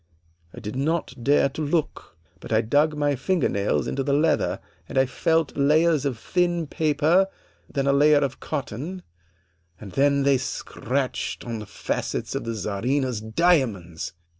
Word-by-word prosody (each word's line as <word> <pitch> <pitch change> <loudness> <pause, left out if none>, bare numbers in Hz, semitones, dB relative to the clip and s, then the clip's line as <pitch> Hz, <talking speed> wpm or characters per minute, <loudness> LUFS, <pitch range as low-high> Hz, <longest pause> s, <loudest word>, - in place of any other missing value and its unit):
I - - -10
did 105 +2 -6
not 155 +1 -1
dare 140 +1 +4
to 140 - -6
look, 150 - -2 0.2
but - - -10
I 110 0 +4
dug 145 +7 +2
my 145 -1 +1
finger 185 +6 +1
nails 100 +1 0
into 135 - -2
the 140 +1 0
leather 155 +3 +1 0.3
and - - -4
I 130 - +5
felt 160 +4 0
layers 150 +1 +3
of 130 -5 -1
thin 175 +5 0
paper, 155 +4 +2 0.4
then 140 -2 -1
a 140 - +3
layer 150 +1 +5
of 140 -2 -1
cotton, 155 - -5 0.8
and 100 -3 -9
then 140 +2 +2
they 140 -1 +3
scratched 135 0 -3
on 115 -2 -4
the 105 - -8
facets - - -3
of - - -3
the 115 0 -3
Czarina's 115 +4 -1
diamonds! 110 - 0
140 Hz, 160 wpm, -24 LUFS, 120-155 Hz, 0.8 s, I